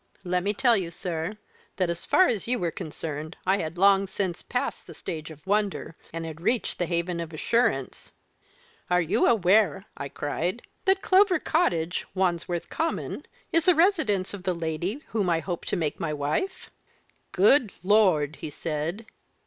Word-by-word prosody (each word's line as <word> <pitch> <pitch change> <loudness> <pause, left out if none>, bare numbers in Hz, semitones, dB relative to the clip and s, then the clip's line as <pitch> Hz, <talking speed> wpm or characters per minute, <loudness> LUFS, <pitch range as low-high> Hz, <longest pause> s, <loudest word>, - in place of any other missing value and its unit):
Let 180 -1 0
me 200 +3 0
tell 240 +1 +4
you, 185 -5 -1
sir, 170 +3 -4 0.4
that 185 -3 +1
as 170 - -6
far 375 - +5
as 220 -3 -1
you 250 +1 +1
were 175 -5 -1
concerned, 155 -2 -6
I 190 +2 +3
had 165 -1 -4
long 195 +1 +5
since 185 -3 -3
passed - - -3
the - - -10
stage 155 -1 -6
of 155 +1 -13
wonder, 205 -4 0 0.2
and 165 0 -4
had 160 0 -7
reached 235 +6 0
the 175 - 0
haven 170 0 -1
of 165 -1 -5
assurance. 235 +10 0 0.8
'Are 180 0 +4
you 165 -2 +2
aware?' 200 -4 +3
I 140 - -5
cried, 175 - -3 0.2
'that 385 0 +3
Clover 380 -1 +5
Cottage, 180 - 0
Wandsworth 175 -2 0
Common, 325 +1 -3 0.2
is 330 -1 +3
the 360 - +6
residence 310 - +2
of 200 - -6
the 180 -1 -1
lady 170 - -3
whom 205 -5 0
I 165 -1 +2
hope 175 0 -4
to - - -1
make 160 -5 -2
my 155 -2 -2
wife?' 335 - -2 0.6
'Good 215 +3 +4
Lord!' 180 -8 +3
he - - -6
said. 160 +8 -3
180 Hz, 170 wpm, -26 LUFS, 165-215 Hz, 0.8 s, the